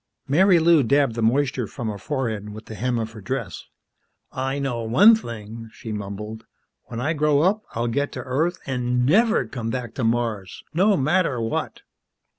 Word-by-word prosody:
Marilou 170 +1 +5
dabbed 140 0 +2
the 115 - -3
moisture 130 +1 +1
from 115 - -6
her 105 -2 -4
forehead 110 -6 -3
with 110 +1 -9
the - - -9
hem 120 +4 -1
of 110 -1 -3
her 110 -1 -11
dress. 105 - -4 0.7
"I 135 +1 -2
know 135 -4 -2
one 130 - +6
thing," 115 - -5
she 120 -3 -8
mumbled. 105 +2 -6 0.4
"When 115 - -6
I 145 +6 0
grow 150 -1 +2
up, 200 +4 +2
I'll 115 +1 -1
get 140 +5 -1
to 130 - -5
Earth 155 +8 0
an' 125 -1 0
never 220 - +3
come 115 -3 -5
back 125 -1 -4
to 130 - -3
Mars, 115 -5 -1
no 195 +4 +3
matter 155 -2 +1
what!" 115 0 -3
125 Hz, 175 wpm, -23 LUFS, 115-145 Hz, 0.7 s, one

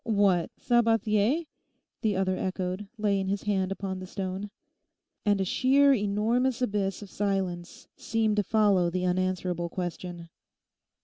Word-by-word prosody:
'What, 200 -6 +2
Sabathier?' 230 +4 +2 0.6
the 215 -3 +1
other 185 0 +1
echoed, 185 +2 -3
laying 200 -3 +1
his 195 +1 -1
hand 195 -2 0
upon 195 -1 -4
the 185 - -7
stone. 190 +1 -4 0.8
And 205 -1 +3
a 190 - +1
sheer 275 +7 +4
enormous 225 +4 +1
abyss 205 -5 -1
of 200 - -12
silence 190 -4 -3
seemed 220 -2 0
to 205 - +3
follow 200 -4 +3
the 180 +1 -2
unanswerable 180 -1 -1
question. 175 -1 -5
195 Hz, 130 wpm, -28 LUFS, 185-215 Hz, 0.8 s, sheer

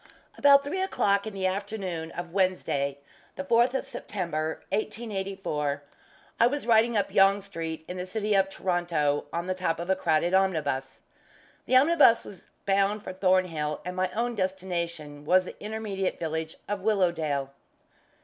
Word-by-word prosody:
About 280 -1 +6
three 315 +7 -2
o'clock 200 - +1
in 215 - -5
the 190 -1 -2
afternoon 190 -4 -3
of 175 -1 -6
Wednesday, 180 -7 0 0.4
the - - -4
fourth 240 0 +3
of - - -1
September, 160 -5 -4
1884, 195 -9 -3 0.6
I 235 - +6
was 285 +1 -2
riding 230 0 +4
up 200 - -1
Yonge 195 +1 +5
Street, 165 -4 -6
in 180 - -6
the 180 0 -4
city 210 +2 -1
of 195 -1 +3
Toronto, 175 -6 0
on 170 +1 -2
the 185 - -1
top 185 -3 -1
of 175 +2 -2
a - - +4
crowded 170 -1 +1
omnibus. 155 -9 0 0.7
The 255 - +2
omnibus 265 -4 +6
was 195 - -12 0.2
bound 200 +1 +1
for 185 - -6
Thornhill, 180 -6 +1
and 180 0 -4
my 185 0 0
own 240 +2 -1
destination 170 -6 -3
was 185 +4 +4
the - - -10
intermediate 210 -3 -3
village 160 -1 -3
of 205 -1 -3
Willowdale. 165 -9 0
185 Hz, 155 wpm, -27 LUFS, 165-210 Hz, 0.7 s, About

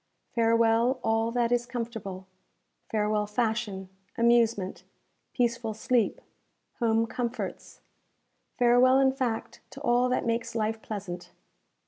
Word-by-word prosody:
Farewell, 230 +2 +3
all 225 +1 +1
that 235 0 0
is 240 0 +1
comfortable 225 -6 -5 0.6
Farewell, 210 -1 0
fashion, 215 -3 -2 0.3
amusement, 230 -5 +2 0.5
peaceful 235 -2 -1
sleep, 235 0 +1 0.6
home 225 -1 +2
comforts 240 +1 -5 0.8
Farewell, 245 +1 +5
in 270 -1 +4
fact, 250 -4 -3
to 270 +1 -11
all 245 -1 +2
that 250 - 0
makes 230 0 -2
life 220 0 -1
pleasant! 185 -4 -6
230 Hz, 105 wpm, -28 LUFS, 220-245 Hz, 0.8 s, Farewell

